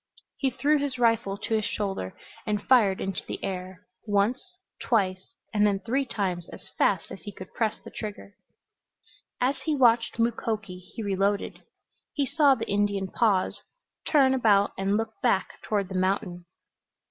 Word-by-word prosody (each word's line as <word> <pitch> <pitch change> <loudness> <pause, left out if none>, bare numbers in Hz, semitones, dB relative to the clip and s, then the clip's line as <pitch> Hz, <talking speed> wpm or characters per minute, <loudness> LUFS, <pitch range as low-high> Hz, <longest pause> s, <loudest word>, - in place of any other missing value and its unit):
He 270 - +1
threw 290 +4 +2
his 280 -2 -2
rifle 230 -4 +2
to 225 - -4
his 215 -1 +2
shoulder 195 - -3 0.3
and 210 -1 0
fired 215 -7 +4
into 195 -1 -3
the - - -4
air; 185 -1 -5 0.2
once, 230 - 0 0.2
twice 190 -5 0 0.2
and 210 -1 +3
then 200 -1 +2
three 265 +6 0
times 185 -6 -2
as - - -11
fast 190 -5 +1
as - - -8
he 205 - -7
could 185 -1 -11
press 220 -2 0
the - - -10
trigger. 205 -1 -7 1.1
As 265 +2 +1
he 310 - +1
watched 235 -4 +3
Mukoki 220 -5 -1
he 185 +5 -8
reloaded. 200 0 0 0.5
He 285 -3 0
saw 285 0 +4
the - - -5
Indian 200 -1 0
pause, 205 -5 +1 0.5
turn 270 -4 +5
about 210 -6 +4
and 195 +2 +1
look 225 0 -2
back 190 - 0
toward 205 -3 -1
the 190 - -8
mountain. 185 -2 -1
205 Hz, 160 wpm, -27 LUFS, 195-240 Hz, 1.1 s, turn